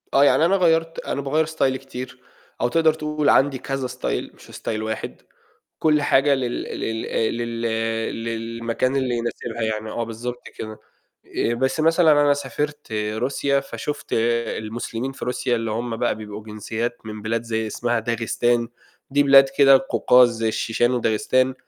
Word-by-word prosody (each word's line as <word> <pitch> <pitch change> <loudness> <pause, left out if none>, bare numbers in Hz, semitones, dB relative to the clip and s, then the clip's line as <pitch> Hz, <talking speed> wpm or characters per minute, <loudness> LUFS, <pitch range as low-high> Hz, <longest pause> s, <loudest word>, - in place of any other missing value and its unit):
آه، 135 - +6
يعني 135 +3 +4
أنا 190 +3 +3
غيّرت 165 -3 +2
أنا 140 - -3
باغيّر 150 +3 +1
ستايلي 135 -4 0
كتير 130 -1 -8 0.4
أو - - +3
تقدر 160 +4 +3
تقول 150 -1 -1
عندي 135 0 +4
كذا 135 0 -3
style - - -4
مش - - -17
style 110 -1 -4
واحد 110 0 -5 0.6
كُلّ 155 -2 +3
حاجة 140 0 +4
لل 125 -2 -2
لل 110 0 -4
آآ، 110 - 0
لل 115 0 -4 0.6
للمكان 115 +2 -2
اللي 130 -3 0
يناسبها 115 0 -4
يعني 110 0 -2
آه 120 - -2
بالضبط 120 +2 -6
كده، 110 0 -7 0.6
آآ، 115 - +1
بس 130 +5 0
مثلًا 165 +1 +5
أنا 145 -1 +5
سافرت 145 0 -4
روسيا 120 +6 0
فشُفت 140 +1 -6
المسلمين 115 +1 -1
في 135 - -7
روسيا، 125 0 0
اللي 115 -1 -2
هم 115 +1 -3
بقى 120 - 0
بيبقوا 105 -1 -8
جنسيات 110 +3 -4
من 110 -1 -7
بلاد 115 +2 -1
زي 110 -1 -2
اسمها 120 +2 -1
داغستان، 115 +1 0 0.4
دي 145 +1 +4
بلاد 135 -1 +7
كده 135 -1 +6
قوقاز 125 -1 +5
زي 115 0 0
الشيشان 115 +2 +1
وداغستان 130 +2 +1
120 Hz, 160 wpm, -22 LUFS, 115-140 Hz, 0.6 s, بلاد